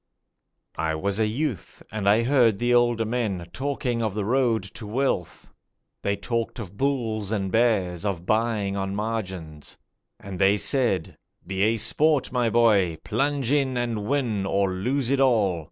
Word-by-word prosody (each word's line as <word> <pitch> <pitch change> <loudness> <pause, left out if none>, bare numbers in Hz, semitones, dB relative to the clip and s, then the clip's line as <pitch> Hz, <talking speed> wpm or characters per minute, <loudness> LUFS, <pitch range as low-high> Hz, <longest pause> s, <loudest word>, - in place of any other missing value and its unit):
I 80 0 0
was 100 +6 -2
a 110 - +2
youth, 125 - -4
and 100 -2 0
I 110 +3 +4
heard 120 -5 +3
the 120 +3 +1
older 120 -2 +3
men 110 -6 -2
talking 130 -3 -2
of 110 -3 -2
the 105 -2 -2
road 120 -2 +1
to 110 - -7
wealth; 115 -6 -2 0.5
They 100 - 0
talked 115 +3 -3
of 100 -5 -8
bulls 110 -5 -1
and 95 -3 -1
bears, 100 -7 +1
of 95 -4 -3
buying 110 -2 0
on 95 0 -3
margins, 95 -8 -5 0.4
And 95 -2 -8
they 100 +1 +4
said, 110 - 0 0.3
'Be 95 +1 -3
a 110 +3 +3
sport, 145 +7 +2
my 125 -2 +1
boy, 105 -8 +3
plunge 135 +2 -1
in 135 -3 +1
and 115 -4 -2
win 125 -8 0
or 95 -1 +1
lose 125 +7 -1
it 140 - +2
all! 110 -10 +3
110 Hz, 160 wpm, -25 LUFS, 100-120 Hz, 0.5 s, I